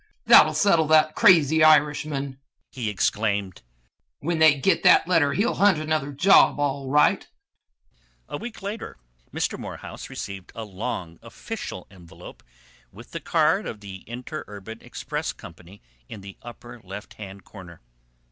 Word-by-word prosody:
"That -, -, +8 dB
will -, -, -5 dB
settle 170 Hz, -6 st, +3 dB
that 155 Hz, 0 st, +4 dB
crazy 160 Hz, -7 st, +5 dB
Irishman!" 150 Hz, -3 st, +2 dB, 0.3 s
he 120 Hz, -5 st, -4 dB
exclaimed. 100 Hz, -1 st, -1 dB, 0.6 s
"When 165 Hz, +2 st, -3 dB
they 155 Hz, -1 st, +6 dB
get 170 Hz, +8 st, +1 dB
that 180 Hz, -2 st, +5 dB
letter 160 Hz, -6 st, +2 dB
he 205 Hz, -, +1 dB
will 245 Hz, -, 0 dB
hunt 200 Hz, -4 st, +3 dB
another 155 Hz, -2 st, -2 dB
job, 170 Hz, +1 st, +4 dB
all 140 Hz, -2 st, -2 dB
right!" 150 Hz, +2 st, +2 dB, 1.0 s
A -, -, -6 dB
week 225 Hz, 0 st, -9 dB
later 205 Hz, +3 st, -6 dB, 0.3 s
Mr. -, -, -3 dB
Morehouse -, -, -9 dB
received 95 Hz, -2 st, -8 dB
a 115 Hz, -, -6 dB
long 95 Hz, -5 st, -6 dB
official -, -, -8 dB
envelope 90 Hz, -3 st, -14 dB, 0.5 s
with -, -, -14 dB
the -, -, -5 dB
card -, -, +1 dB
of 110 Hz, -, -7 dB
the 100 Hz, -2 st, -9 dB
Interurban 115 Hz, -4 st, -8 dB
Express -, -, -5 dB
Company 90 Hz, +4 st, -15 dB, 0.3 s
in 105 Hz, -, -9 dB
the 100 Hz, 0 st, -11 dB
upper 120 Hz, 0 st, -12 dB
left 100 Hz, +2 st, -10 dB, 0.3 s
corner. 90 Hz, -4 st, -13 dB
135 Hz, 140 wpm, -24 LUFS, 105-155 Hz, 1.0 s, That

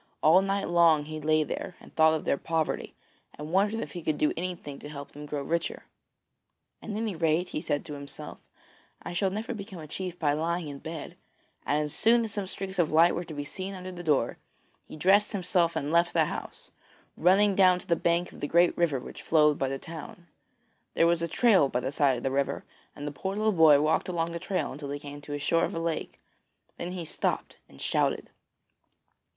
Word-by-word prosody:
All 165 Hz, +5 st, +7 dB
night 195 Hz, 0 st, -1 dB
long 170 Hz, -3 st, +4 dB
he 155 Hz, 0 st, -6 dB
lay 155 Hz, +1 st, +3 dB
there 180 Hz, -, -5 dB
and -, -, -17 dB
thought 160 Hz, 0 st, +5 dB
of 155 Hz, -, -4 dB
their 140 Hz, -, +1 dB
poverty, 165 Hz, -2 st, -2 dB, 0.4 s
and 150 Hz, +1 st, -7 dB
wondered 205 Hz, +4 st, +2 dB
if -, -, -6 dB
he 175 Hz, -, -6 dB
could 155 Hz, -1 st, -1 dB
do 150 Hz, -, +2 dB
anything 170 Hz, -5 st, -5 dB
to 145 Hz, -, -9 dB
help 140 Hz, -1 st, -8 dB
them 150 Hz, +1 st, -9 dB
to -, -, -20 dB
grow 145 Hz, -2 st, -3 dB
richer. 170 Hz, +4 st, -2 dB, 1.0 s
'At -, -, -9 dB
any 215 Hz, -1 st, -2 dB
rate,' 165 Hz, +2 st, +1 dB
he 155 Hz, -, -3 dB
said 145 Hz, -3 st, -2 dB
to 150 Hz, -, -7 dB
himself, 140 Hz, 0 st, -8 dB, 0.6 s
'I 175 Hz, -, -6 dB
shall 195 Hz, +2 st, +1 dB
never 215 Hz, +5 st, -4 dB
become 200 Hz, -4 st, -8 dB
a 160 Hz, -, -8 dB
chief 180 Hz, +3 st, -5 dB
by 145 Hz, -4 st, +1 dB
lying 165 Hz, +1 st, -1 dB
in 140 Hz, -1 st, -7 dB
bed,' 160 Hz, -1 st, -7 dB, 0.5 s
and 150 Hz, +1 st, +2 dB
as 150 Hz, -, -4 dB
soon 235 Hz, +1 st, +4 dB
as 220 Hz, -, -3 dB
some 200 Hz, -2 st, -3 dB
streaks 190 Hz, 0 st, -5 dB
of 165 Hz, -, +2 dB
light 165 Hz, +2 st, +5 dB
were 175 Hz, -, -2 dB
to 165 Hz, -2 st, -9 dB
be 145 Hz, 0 st, -4 dB
seen 190 Hz, +6 st, -5 dB
under 185 Hz, 0 st, -7 dB
the 175 Hz, -1 st, -7 dB
door, 150 Hz, -5 st, +1 dB, 0.5 s
he -, -, -9 dB
dressed 200 Hz, +7 st, +4 dB
himself 180 Hz, -3 st, +1 dB
and 145 Hz, +2 st, -2 dB
left 170 Hz, +1 st, +3 dB
the 160 Hz, -2 st, +4 dB
house, -, -, -7 dB, 0.4 s
running 195 Hz, +4 st, +4 dB
down 185 Hz, -2 st, +5 dB
to -, -, -9 dB
the 170 Hz, -, +2 dB
bank 170 Hz, +1 st, 0 dB
of -, -, -13 dB
the 145 Hz, -, -2 dB
great 170 Hz, +3 st, +4 dB
river 160 Hz, -6 st, +1 dB
which 125 Hz, -, -9 dB
flowed 150 Hz, -2 st, +3 dB
by 135 Hz, -, +1 dB
the 135 Hz, -, -2 dB
town. 165 Hz, +3 st, -9 dB, 0.7 s
There 165 Hz, -, +4 dB
was 170 Hz, 0 st, +3 dB
a 170 Hz, -, 0 dB
trail 190 Hz, -, +4 dB
by 125 Hz, -, 0 dB
the 130 Hz, -, -2 dB
side 140 Hz, -3 st, +2 dB
of 120 Hz, -, -7 dB
the 135 Hz, -, 0 dB
river, 140 Hz, 0 st, -1 dB, 0.3 s
and 145 Hz, -, -7 dB
the 145 Hz, -, -3 dB
poor 190 Hz, +8 st, -4 dB
little 215 Hz, +1 st, +2 dB
boy 160 Hz, -6 st, +6 dB
walked 155 Hz, +4 st, +1 dB
along 170 Hz, -1 st, -1 dB
the 170 Hz, -, -4 dB
trail 185 Hz, -6 st, -2 dB
till 145 Hz, -2 st, -6 dB
he 145 Hz, -, -3 dB
came 145 Hz, 0 st, -9 dB
to 145 Hz, -, -10 dB
the 145 Hz, -, -2 dB
shore 165 Hz, +3 st, +1 dB
of -, -, -1 dB
a -, -, -1 dB
lake; 165 Hz, -1 st, -3 dB, 0.6 s
then 175 Hz, +1 st, -4 dB
he 175 Hz, -3 st, -5 dB
stopped -, -, -2 dB
and 70 Hz, -, -16 dB
shouted. -, -, 0 dB
165 Hz, 225 wpm, -28 LUFS, 150-185 Hz, 1.0 s, All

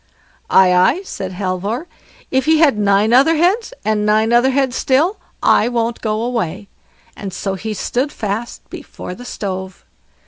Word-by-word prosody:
"Aye, 185 Hz, -1 st, +5 dB
aye", 185 Hz, -, +3 dB
said 190 Hz, -, -6 dB
Halvor, 195 Hz, -, -3 dB, 0.5 s
"if 265 Hz, 0 st, +1 dB
he 315 Hz, 0 st, +4 dB
had 305 Hz, -6 st, +4 dB
nine 205 Hz, +2 st, +2 dB
other 280 Hz, +6 st, +5 dB
heads, 375 Hz, +10 st, +1 dB
and 215 Hz, -1 st, +1 dB
nine 215 Hz, +2 st, +2 dB
other 240 Hz, +2 st, +4 dB
heads 265 Hz, -1 st, 0 dB
still, 305 Hz, +9 st, +1 dB, 0.2 s
I 220 Hz, -, +4 dB
won't 235 Hz, -1 st, -2 dB
go 215 Hz, 0 st, -1 dB
away", 215 Hz, -5 st, -3 dB, 0.5 s
and 195 Hz, -2 st, -6 dB
so 195 Hz, +1 st, -3 dB
he 215 Hz, +3 st, -5 dB
stood 255 Hz, +8 st, -2 dB
fast 220 Hz, 0 st, -5 dB
before -, -, -8 dB
the 245 Hz, +6 st, -11 dB
stove. 190 Hz, -5 st, -6 dB
225 Hz, 160 wpm, -17 LUFS, 200-265 Hz, 0.5 s, Aye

